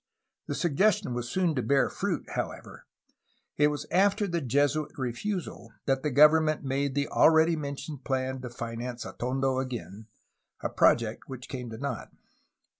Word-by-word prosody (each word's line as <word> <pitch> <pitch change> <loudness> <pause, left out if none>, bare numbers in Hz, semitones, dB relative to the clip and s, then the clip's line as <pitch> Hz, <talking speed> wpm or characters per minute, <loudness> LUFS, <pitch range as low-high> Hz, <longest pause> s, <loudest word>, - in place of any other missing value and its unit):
The - - -2
suggestion 190 - +2
was 120 0 -3
soon 180 0 +1
to 130 - -1
bear 140 +2 +3
fruit, - - -2
however. - - -5 0.7
It 150 - +5
was 150 0 -3
after 200 +3 +3
the 170 -3 -1
Jesuit 145 +3 0
refusal 130 - -4
that 135 -1 +1
the 150 - 0
government 155 +2 +5
made 135 0 -1
the 145 0 +1
already 160 +1 +5
mentioned 140 -1 -6
plan 130 -1 -2
to 125 - -6
finance 120 +1 -5
Atondo 130 +1 -1
again, 110 -5 -7 0.5
a - - -1
project 115 -1 +2
which 130 -2 -8
came 125 -3 -6
to 110 - -7
naught. 140 -3 -4
135 Hz, 150 wpm, -28 LUFS, 125-155 Hz, 0.7 s, It